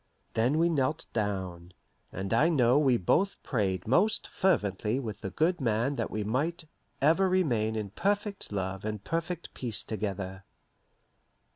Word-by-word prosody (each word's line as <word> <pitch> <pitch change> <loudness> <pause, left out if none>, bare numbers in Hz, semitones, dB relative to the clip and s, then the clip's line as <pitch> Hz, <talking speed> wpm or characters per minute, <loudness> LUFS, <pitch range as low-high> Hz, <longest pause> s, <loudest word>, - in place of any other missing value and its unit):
Then 120 +7 +2
we 165 +1 +4
knelt 150 -2 0
down, 95 -5 -3 0.4
and 95 +3 -3
I 145 +8 +4
know 130 -4 +4
we 130 -5 +4
both 190 - +1
prayed 95 -7 -1
most 185 - +3
fervently 110 - +1
with 110 -6 -6
the 95 - -3
good 160 - +1
man 120 +3 +1
that - - -1
we 105 - -2
might 150 +10 -1 0.4
"ever 165 +6 +4
remain 120 -13 +1
in 105 -3 -3
perfect 200 - -1
love 95 -1 -3
and 105 -1 -4
perfect 165 +1 -3
peace 115 -5 -2
together." 95 -3 -4
120 Hz, 145 wpm, -29 LUFS, 100-165 Hz, 0.4 s, we